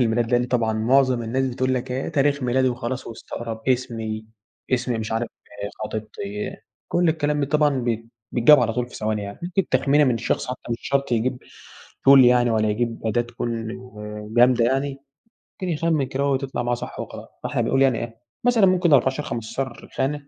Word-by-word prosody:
الميلاد، 115 0 +1
لأن 120 0 +4
طبعًا 120 -3 +1
معظم 125 +2 +3
الناس 130 +4 0
بتقول 130 +1 0
لك 125 0 -3
إيه، 130 +2 -2
تاريخ 145 -2 +1
ميلادي 130 +1 +2
وخلاص 125 +1 -4
ويستقرب، 115 0 -6
اسمي، 115 -4 -1 0.5
اسم 125 0 +1
مش 110 0 -4
عارف 115 +1 -1 0.6
خطيبتي، 105 -1 -5 0.3
كُلّ 175 -1 +2
الكلام 150 -2 +1
ده 140 - +1
طبعًا 150 -2 +2
بيت 115 -1 -2 0.3
بيتجاب 130 +3 +7
على 115 -2 +1
طول 125 +1 -1
في - - -15
ثواني 110 -1 -1
يعني، 100 0 -7
ممكن 180 +1 -1
تخمينة 145 +1 +3
من 120 -3 +1
شخص 115 - -1
حتى 125 0 -5
مش 115 - -1
شرط 140 -2 0
يجيب 125 +2 0 0.7
Tool 140 0 +10
يعني 120 -1 +5
ولا 110 -1 +2
يجيب 115 +2 -2
أداة 120 +2 +2
تكون 115 -1 -4 0.7
جامدة 120 -1 +5
يعني، 135 +2 0 0.6
ممكن 185 -2 -5
يخمن 155 -3 +1
كده 135 +2 -1
وتطلع 135 -2 -1
معاه 120 0 0
صح 120 - -8
وخلاص، - - -7 0.2
فإحنا - - -1
بنقول 135 - +1
يعني 130 -4 +4
إيه 115 0 -7 0.2
مثلًا 240 -5 +5
ممكن 180 -4 +3
14 135 +2 +3
15 120 +2 -5
خانة 140 +1 -1
125 Hz, 180 wpm, -23 LUFS, 115-140 Hz, 0.7 s, Tool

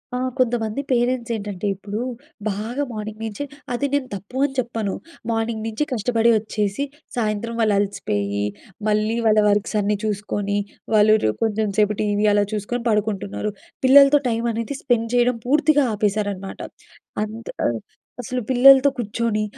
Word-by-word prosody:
ఆ! - - 0 0.2
కొంతమంది 235 -1 0
పేరెంట్స్ 240 -1 +1
ఏంటంటే, 205 -2 -4
ఇప్పుడు 205 +3 -5 0.5
బాగా 225 +8 -3
మార్నింగ్ 215 0 -6
నుంచి 220 +5 -4 0.3
అది 280 +4 -1
నేను 285 -2 +1
తప్పు 200 +7 -8
అని 275 - -3
చెప్పను. 225 -5 -2 0.4
మార్నింగ్ 225 -1 -1
నుంచి 225 +6 -1
కష్టపడి 230 0 +2
ఒచ్చేసి, 210 +2 -2 0.3
సాయంత్రం 225 0 -1
వాళ్ళు 215 -2 +3
అలసిపోయి, 100 - -1 0.4
మళ్ళీ 215 +1 +1
వాళ్ళ 215 0 +5
వర్క్స్ 205 +2 0
అన్నీ 205 0 0
చూసుకొని, 205 -1 -2 0.4
వాళ్ళు 215 0 +6
రు 110 - +3
కొంచెం 220 -1 0
సేపు 210 0 +3
టీవీ 205 0 +1
అలా 205 0 +4
చూసుకొని 215 +3 -3
పడుకుంటున్నారు. 210 -1 -1 0.3
పిల్లలతో 280 +2 +8
టైం 230 0 -1
అనేది 230 +5 -3
స్పెండ్ 230 -3 +1
చేయడం 245 0 +3
పూర్తిగా 295 0 +4
ఆపేశారన్నమాట. 205 -2 -2 0.6
అంత 220 +2 -7 0.2
ఆహ్, 115 -1 0 0.4
అసలు 250 +1 -3
పిల్లలతో 270 +2 +7
కూర్చొని, 220 -1 -1
215 Hz, 140 wpm, -22 LUFS, 205-240 Hz, 0.6 s, పిల్లలతో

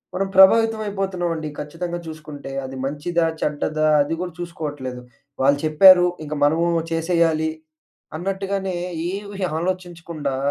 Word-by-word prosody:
మనం 195 - 0
ప్రభావితం 225 +4 +6
అయిపోతున్నామండి 180 -5 -2
ఖచ్చితంగా 170 +3 -5
చూసుకుంటే. 150 -3 -8
అది 130 0 -7
మంచిదా, 150 +5 -1 0.2
చెడ్డదా! 155 +1 0
అది 145 +3 -1
గూడా 180 -1 -4
చూసుకోవట్లేదు. 145 -7 -5 0.4
వాళ్ళు 140 +2 +4
చెప్పారు. 180 +4 +7 0.2
ఇంక 150 - -5
మనమూ 160 +4 +3 0.2
చేసేయాలి. 165 -1 +1 0.7
అన్నట్టుగానే 195 +1 -2 0.3
ఏవీ 200 +1 -6 0.2
ఆలోచించకుండా 170 -5 -4
170 Hz, 110 wpm, -22 LUFS, 155-185 Hz, 0.7 s, చెప్పారు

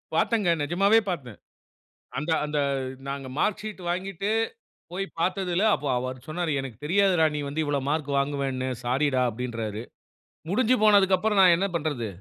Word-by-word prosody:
பார்த்தங்க. 215 -6 +2
நெஜமாவே 195 +9 +4
பார்த்தேன். 130 - -5 0.8
அந்த 150 +3 -2
அந்த 150 0 -2 0.5
நாங்க 140 -1 -4
மார்க் 210 - 0
ஷீட் 215 -3 -7
வாங்கிட்டு 195 +2 -2 0.6
போய் 195 +2 -2 0.2
பார்த்ததில 185 0 0
அப்போ 145 0 -3
அவர் 130 +1 -4
சொன்னாரு, 165 +1 -2
"எனக்குத் 135 0 -8
தெரியாதுரா 180 -1 +3
நீ - - -2
வந்து 150 +3 -2
இவ்வளோ 145 -1 0
மார்க் 150 -2 -1
வாங்குவேன்னு. 140 -2 -1 0.2
ஸாரிடா!" 130 +1 +1
அப்படீன்றாரு. 115 -2 -4 0.7
முடிஞ்சு 240 +5 +3
போனதக்கப்பறம் 205 0 +4
நான் 180 -2 +7
என்ன 195 +3 0
பண்றது? 145 -8 -2
160 Hz, 140 wpm, -26 LUFS, 135-195 Hz, 0.8 s, நான்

